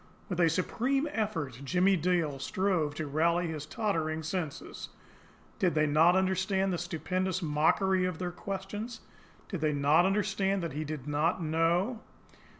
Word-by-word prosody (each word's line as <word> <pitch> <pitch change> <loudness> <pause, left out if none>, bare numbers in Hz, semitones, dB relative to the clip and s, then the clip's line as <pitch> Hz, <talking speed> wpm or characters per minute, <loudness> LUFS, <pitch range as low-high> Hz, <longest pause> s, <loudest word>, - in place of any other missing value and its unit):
With 180 -2 -3
a 170 -2 +5
supreme 255 - 0
effort, 160 - -3
Jimmie 185 +7 +3
Dale 165 -5 0
strove 170 -1 0
to 155 - -3
rally 170 +4 +1
his 155 -3 -5
tottering 160 -7 -1
senses. 160 -2 -5 0.7
Did 180 -6 +2
they 155 0 +3
not 160 +4 +5
understand 190 0 +1
the 175 - -2
stupendous 185 +2 -2
mockery 180 +5 +2
of 180 -3 -2
their 180 0 -3
questions? 200 +5 -6 0.5
Did 185 -6 -5
they 155 -1 +2
not 145 +5 +4
understand 195 -1 0
that 165 - -3
he 150 +2 -3
did 150 -3 -5
not 160 +5 +1
know? 170 +9 +1
175 Hz, 150 wpm, -30 LUFS, 155-190 Hz, 0.7 s, a